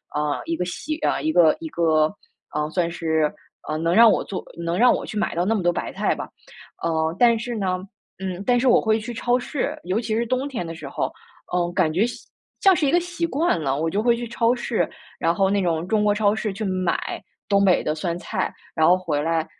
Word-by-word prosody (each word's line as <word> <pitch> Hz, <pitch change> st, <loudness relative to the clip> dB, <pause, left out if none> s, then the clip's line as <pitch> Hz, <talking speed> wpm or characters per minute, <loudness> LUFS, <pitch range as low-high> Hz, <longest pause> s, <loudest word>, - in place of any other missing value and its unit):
呃， 150 Hz, -1 st, -1 dB
一 165 Hz, -, -1 dB
个 180 Hz, -, -2 dB
习 235 Hz, -, -4 dB
啊， -, -, +1 dB
一 315 Hz, -, 0 dB
个 160 Hz, -3 st, +6 dB
一 330 Hz, -, -6 dB
个， 160 Hz, -, +2 dB, 0.5 s
呃， 150 Hz, 0 st, 0 dB
算 170 Hz, -1 st, 0 dB
是， 160 Hz, -2 st, 0 dB, 0.4 s
呃， 155 Hz, -, -2 dB
能 165 Hz, +2 st, 0 dB
让 230 Hz, +3 st, +8 dB
我 205 Hz, -, +2 dB
做 195 Hz, -, -5 dB, 0.2 s
能 170 Hz, +2 st, -2 dB
让 250 Hz, -, +6 dB
我 -, -, -4 dB
去 215 Hz, -, -6 dB
买 215 Hz, -, -1 dB
到 175 Hz, -, +1 dB
那 215 Hz, -, +1 dB
么 210 Hz, -, 0 dB
多 175 Hz, 0 st, +2 dB
白 -, -, -3 dB
菜 -, -, 0 dB
吧。 -, -, -6 dB, 0.5 s
呃， 160 Hz, -1 st, 0 dB
但 235 Hz, -2 st, +5 dB
是 240 Hz, +2 st, -4 dB
呢， 190 Hz, -5 st, -1 dB, 0.4 s
嗯， 190 Hz, -1 st, -4 dB
但 245 Hz, -1 st, +3 dB
是 255 Hz, +1 st, +3 dB
我 -, -, +6 dB
会 220 Hz, -1 st, +2 dB
去 230 Hz, +2 st, -6 dB
超 245 Hz, +2 st, +1 dB
市， 255 Hz, +2 st, -3 dB
尤 185 Hz, +5 st, 0 dB
其 220 Hz, -2 st, -2 dB
是 235 Hz, +1 st, 0 dB
冬 255 Hz, +4 st, -1 dB
天 250 Hz, -11 st, -4 dB
的 165 Hz, -, -6 dB
时 155 Hz, -4 st, -8 dB
候， -, -, -2 dB, 0.4 s
嗯， 175 Hz, -1 st, +1 dB
感 165 Hz, -5 st, +2 dB
觉 200 Hz, +7 st, +3 dB
像 245 Hz, -, -6 dB, 0.4 s
像 385 Hz, -1 st, +7 dB
是 300 Hz, -4 st, +1 dB
一 -, -, +2 dB
个 345 Hz, -, +4 dB
习 350 Hz, -1 st, -3 dB
惯 325 Hz, -, +1 dB
了， 135 Hz, -1 st, 0 dB
我 165 Hz, -, 0 dB
就 200 Hz, +5 st, 0 dB
会 235 Hz, +1 st, +3 dB
去 240 Hz, 0 st, -4 dB
超 235 Hz, +1 st, +1 dB
市， 235 Hz, -1 st, -1 dB, 0.3 s
然 165 Hz, +1 st, +1 dB
后 195 Hz, +1 st, +2 dB
那 200 Hz, 0 st, +1 dB
种 165 Hz, -2 st, 0 dB
中 215 Hz, +1 st, +2 dB
国 205 Hz, -1 st, +3 dB
超 205 Hz, -1 st, +3 dB
市 215 Hz, -2 st, -2 dB
去 215 Hz, +3 st, -5 dB
买 185 Hz, -3 st, -1 dB, 0.3 s
东 200 Hz, 0 st, +4 dB
北 185 Hz, -2 st, +4 dB
的 150 Hz, -, 0 dB
酸 170 Hz, +2 st, -3 dB
菜。 -, -, -3 dB, 0.2 s
然 160 Hz, -1 st, +3 dB
后 180 Hz, -, +6 dB
回 160 Hz, -5 st, -1 dB
来， 165 Hz, +1 st, 0 dB
190 Hz, 260 characters per minute, -23 LUFS, 165-235 Hz, 0.5 s, 让